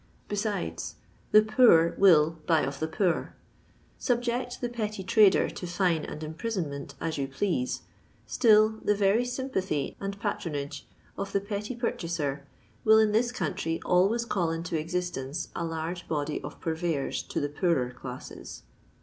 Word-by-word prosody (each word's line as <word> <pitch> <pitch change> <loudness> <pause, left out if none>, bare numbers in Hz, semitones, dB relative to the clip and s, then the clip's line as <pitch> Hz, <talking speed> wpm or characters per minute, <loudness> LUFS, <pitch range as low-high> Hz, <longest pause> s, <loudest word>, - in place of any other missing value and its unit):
Be 205 - -3
sides, 200 - -3 0.4
the 215 - +8
poor 215 -8 +5
wUl 160 -5 +6 0.2
buy 160 -2 +4
of 135 0 -3
the 160 - -1
poor. 175 +2 0 0.6
Subject 245 0 -1
the 245 - -1
petty 215 -4 -4
trader 200 +1 +5
to 180 - -6
fine 175 -2 +1
and 155 - -7
imprisonment 160 -3 -4
as 160 -3 -2
yon 135 - -1
please, 205 - -1 0.4
still 220 -1 +4
the 210 - +3
very 200 +3 +3
sympathy 245 - -2
and 200 0 -4
patronage 150 -10 -4 0.3
of 200 0 -4
the 200 - +3
petty 205 +4 -4
purchaser 165 - -2 0.4
will 220 0 +7
in 220 -1 +4
this 235 +3 +2
country 165 - -2
always 200 +7 +3
call 180 -7 0
into 165 +1 -3
existence 165 -2 -3
a - - -2
large 165 +2 -4
body 150 -1 -2
of - - -8
purveyors 160 -3 -1
to - - -4
the 145 - 0
poorer 145 -5 +1
classes. 125 0 -9
180 Hz, 150 wpm, -28 LUFS, 155-215 Hz, 0.6 s, the